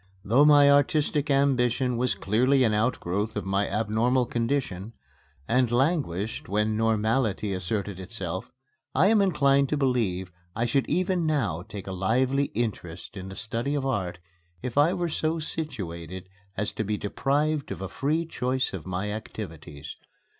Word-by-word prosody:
Though 125 +8 +5
my 145 -1 +7
artistic 145 +1 +2
ambition 130 -3 +2
was 125 +1 0
clearly 130 +6 +2
an 110 -3 +2
outgrowth 105 -2 -1
of 105 - -3
my 100 +1 0
abnormal 115 +4 +1
condition, 115 -5 -2 0.5
and 125 -1 +2
languished 120 - 0
when 105 +2 +1
normality 110 -1 +1
asserted 95 +1 -3
itself, 95 -2 -5 0.4
I 170 +9 +5
am 220 -2 +5
inclined 140 -7 +3
to 150 - 0
believe 110 -10 0 0.2
I 115 +2 0
should 130 +3 +1
even 180 -2 +1
now 115 - 0
take 100 0 -8
a 95 - -5
lively 125 +9 +1
interest 100 -7 -4
in 95 -1 -7
the 95 - -8
study 115 +7 -2
of 140 -2 -1
art 95 -9 -1 0.5
if 125 -2 -4
I 145 +4 +5
were 175 -2 -1
so 160 0 -1
situated 95 - -5 0.3
as 105 +1 -1
to 110 - -3
be 105 0 -1
deprived 145 +8 0
of - - -4
a 95 - -4
free 155 - -1
choice 130 -5 -1
of 95 -2 -6
my 95 +3 -2
activities. 85 -9 -7
115 Hz, 155 wpm, -26 LUFS, 100-140 Hz, 0.5 s, my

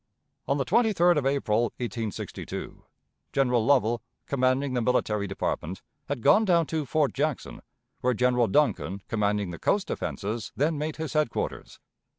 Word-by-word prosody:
On 140 - +1
the 135 - 0
23d 180 -8 +3
of 135 - -1
April, 120 -5 +1
1862, 115 -3 -5 0.5
General 125 -4 +2
Lovell, 120 -3 +3 0.2
commanding 130 0 +1
the 125 - +1
military 105 -4 +1
department, 95 -2 -3 0.3
had 140 -5 -3
gone 220 - +6
down 170 -5 +3
to 155 -2 -3
Fort 150 0 +1
Jackson, 145 -1 -2 0.4
where 125 0 +1
General 125 0 +3
Duncan, 100 -5 +1
commanding 105 -3 0
the 85 - -8
coast 200 - +1
defenses, 105 +1 -3
then 155 +4 +1
made 155 +1 -2
his 160 0 -5
headquarters. 155 -7 -2
130 Hz, 145 wpm, -27 LUFS, 110-150 Hz, 0.5 s, gone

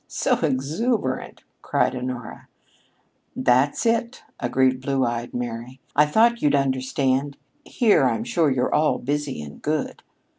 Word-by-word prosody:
"So - - 0
exuberant!" 150 - -1 0.2
cried - - 0
Honora. 125 -2 -6 0.9
"That's 130 - +2
it!" 235 +2 0 0.2
agreed 130 +1 +1
"Blue 135 -1 0
eyed 120 0 -3
Mary." 120 +1 -5 0.2
"I 150 +1 +5
thought 235 +9 +3
you'd 145 -1 +3
understand. 135 +1 0 0.3
Here, 225 -4 +3
I'm 225 - 0
sure, 175 -10 +1
you're 130 -1 0
all 155 0 +2
busy 145 - -3
and 70 -1 -11
good." 155 0 -2
135 Hz, 125 wpm, -23 LUFS, 130-155 Hz, 0.9 s, I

